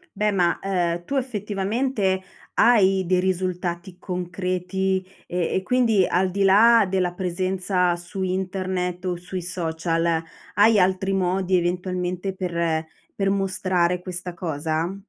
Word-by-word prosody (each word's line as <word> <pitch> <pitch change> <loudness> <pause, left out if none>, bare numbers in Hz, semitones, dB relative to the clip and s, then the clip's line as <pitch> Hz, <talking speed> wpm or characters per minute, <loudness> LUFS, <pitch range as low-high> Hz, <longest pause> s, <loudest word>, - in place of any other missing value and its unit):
Beh 210 +1 +1
ma, 180 -3 +1
uhm, 175 -3 -1
tu 280 - -3
effettivamente 210 -3 -1 0.3
hai 195 -5 +4
dei 185 0 +3
risultati 180 -1 -2
concreti, 185 +1 -2 0.2
e 175 -1 -1
e 190 - 0
quindi 225 -3 +3
al 185 +2 +1
di 195 +2 0
là 220 +3 +6
della 185 -1 0
presenza 185 0 0
su 175 +2 -7
internet 185 -1 -2
o 180 -1 0
sui 180 +1 -6
social, 165 -1 -1 0.3
hai 210 +2 +5
altri 190 +1 +2
modi, 185 0 +1
eventualmente, 180 +1 -2
per 170 -3 -1 0.3
per 195 -1 0
mostrare 185 -2 0
questa 180 0 -6
cosa? 160 +1 -2
185 Hz, 125 wpm, -23 LUFS, 175-195 Hz, 0.3 s, là